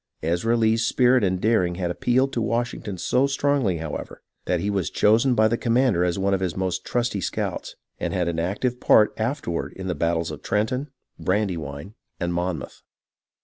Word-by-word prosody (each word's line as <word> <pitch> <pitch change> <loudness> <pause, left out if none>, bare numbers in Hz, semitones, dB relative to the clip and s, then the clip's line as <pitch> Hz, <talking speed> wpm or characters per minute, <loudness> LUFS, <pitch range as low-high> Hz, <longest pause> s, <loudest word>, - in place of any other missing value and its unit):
Ezra 90 +9 +1
Lee's 115 0 +2
spirit 125 0 +3
and 95 -1 +1
daring 95 -5 +2
had 90 -1 -2
appealed 130 +8 +1
to 120 - -1
Washington 115 -3 -2
so 130 +10 +2
strongly, 135 -9 +1
however, 80 -2 -6 0.2
that - - +1
he 100 - -2
was 95 -4 -1
chosen 115 +5 +3
by 110 -1 +4
the 115 +1 -1
commander 120 -6 +2
as 90 0 0
one 100 +1 +1
of 95 - +1
his 95 -2 -2
most 95 -1 -1
trusty 120 -5 -1
scouts, - - -3 0.2
and - - -2
had 90 -2 0
an 85 -1 -1
active 105 +9 -1
part 105 - +5
afterward 110 - -2
in 95 - -8
the 90 - -1
battles 85 -1 -1
of - - -8
Trenton, 125 +7 -1 0.3
Brandywine, 90 -4 -2 0.3
and 85 0 -1
Monmouth. 90 0 -3
100 Hz, 180 wpm, -24 LUFS, 90-120 Hz, 0.3 s, part